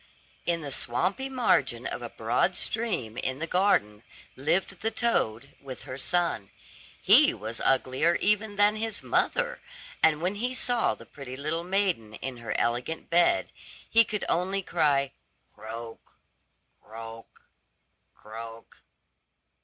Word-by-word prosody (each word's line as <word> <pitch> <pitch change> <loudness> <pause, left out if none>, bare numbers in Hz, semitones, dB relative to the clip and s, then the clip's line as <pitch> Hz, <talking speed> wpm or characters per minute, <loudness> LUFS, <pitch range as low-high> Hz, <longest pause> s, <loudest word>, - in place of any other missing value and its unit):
In 170 -1 +1
the 145 -2 -5
swampy 185 - +1
margin 260 -2 +1
of - - -4
a - - -5
broad - - 0
stream 175 - -1
in 130 +1 -2
the 160 - -3
garden 165 - +2 0.3
lived 170 +7 0
the 225 - +1
toad, 140 - -1
with 130 -2 -9
her 130 +1 -7
son. 165 - 0 0.5
He - - +6
was 110 +2 -6
uglier 135 +5 +2
even 210 +1 +1
than 205 +1 +4
his 220 -1 -3
mother, - - 0 0.4
and 155 -1 +4
when 180 +4 0
he 250 +1 -1
saw 245 -2 +1
the - - -14
pretty 135 -3 -9
little 155 +5 -2
maiden 180 - 0
in 130 -2 -6
her 115 -1 -3
elegant 120 +9 -2
bed, 175 - +3 0.4
he 230 0 +6
could 210 -2 -3
only 190 +3 0
cry, 145 -6 +1 0.4
"Croak, 115 +1 -9 0.7
croak, 115 +1 -11 0.7
croak." 115 +1 -10
160 Hz, 130 wpm, -28 LUFS, -, 0.7 s, He